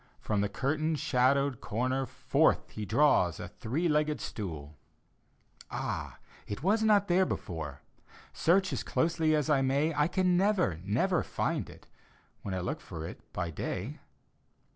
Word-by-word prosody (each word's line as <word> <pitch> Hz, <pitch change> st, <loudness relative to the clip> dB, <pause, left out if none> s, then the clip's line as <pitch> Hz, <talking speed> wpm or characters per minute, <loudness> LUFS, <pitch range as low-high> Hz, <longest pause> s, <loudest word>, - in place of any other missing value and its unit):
From 105 Hz, -2 st, 0 dB
the 100 Hz, -, 0 dB
curtain 155 Hz, +7 st, 0 dB
shadowed 140 Hz, -2 st, +2 dB
comer 130 Hz, +4 st, -1 dB
Forth -, -, +1 dB
he 105 Hz, -, -5 dB
draws 110 Hz, -, +3 dB
a -, -, -5 dB
three 150 Hz, +10 st, -2 dB
legged 150 Hz, -1 st, +1 dB
stool 80 Hz, -8 st, -6 dB, 0.5 s
— -, -, -40 dB
{Ah, -, -, -4 dB, 0.3 s
it 105 Hz, -, -5 dB
was 210 Hz, +5 st, +3 dB
not 210 Hz, -2 st, +4 dB
there 180 Hz, +2 st, +4 dB
before! 80 Hz, -, -4 dB, 0.5 s
Search 185 Hz, +3 st, +2 dB
as -, -, -1 dB
closely 160 Hz, -1 st, +1 dB
as 150 Hz, -1 st, 0 dB
I 150 Hz, -3 st, +3 dB
may, 140 Hz, +4 st, +1 dB
I 150 Hz, 0 st, +2 dB
can 180 Hz, 0 st, +2 dB
never, 185 Hz, -, +2 dB
never 135 Hz, -, +1 dB
find -, -, -2 dB
it -, -, -14 dB, 0.6 s
When 95 Hz, -2 st, -4 dB
I 90 Hz, -, -2 dB
look -, -, -3 dB
for 80 Hz, -1 st, -7 dB
it -, -, -8 dB
by 85 Hz, -1 st, -3 dB
day!) 75 Hz, -, -4 dB
140 Hz, 155 wpm, -30 LUFS, 105-165 Hz, 0.6 s, not